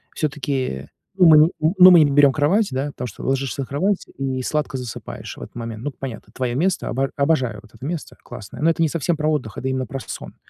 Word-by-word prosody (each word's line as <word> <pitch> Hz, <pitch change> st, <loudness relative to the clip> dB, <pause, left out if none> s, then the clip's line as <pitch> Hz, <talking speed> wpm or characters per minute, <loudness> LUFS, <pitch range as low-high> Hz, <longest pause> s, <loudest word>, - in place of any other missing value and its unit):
Все-таки 135 Hz, -, -2 dB, 0.3 s
ну 185 Hz, -, +6 dB
мы 155 Hz, -1 st, +8 dB
ни 155 Hz, +3 st, +6 dB
ну, 180 Hz, +4 st, +7 dB
мы 175 Hz, -, +8 dB
не 145 Hz, -, +1 dB
берём 140 Hz, 0 st, +6 dB
кровать, 190 Hz, +10 st, +2 dB
да, 135 Hz, +2 st, -2 dB
потому 135 Hz, -3 st, -6 dB
что 105 Hz, -, -10 dB
ложишься 135 Hz, 0 st, -1 dB
на -, -, -3 dB
кровать 190 Hz, +8 st, 0 dB
и 130 Hz, -1 st, -2 dB
сладко 150 Hz, -1 st, -2 dB
засыпаешь 125 Hz, -3 st, -7 dB
в -, -, -11 dB
этот -, -, -10 dB
момент. 115 Hz, -1 st, -6 dB
Ну, 145 Hz, -, -2 dB
понятно, 130 Hz, -4 st, -8 dB
твоё 125 Hz, -2 st, -2 dB
место, 175 Hz, +6 st, 0 dB
обо 135 Hz, +2 st, -1 dB
обожаю 135 Hz, -7 st, +1 dB
вот 110 Hz, -, -20 dB
это 115 Hz, +3 st, -10 dB
место, 165 Hz, +1 st, -5 dB
классное, 120 Hz, +1 st, -10 dB
но 160 Hz, -, +4 dB
это 165 Hz, -, 0 dB
не 160 Hz, -, +2 dB
совсем 165 Hz, +1 st, -1 dB
про 150 Hz, 0 st, 0 dB
отдых, 130 Hz, -9 st, -3 dB
это 130 Hz, -, -4 dB
именно 130 Hz, -1 st, -2 dB
про 135 Hz, -, -5 dB
сон. -, -, -8 dB
140 Hz, 235 wpm, -21 LUFS, 130-155 Hz, 0.3 s, мы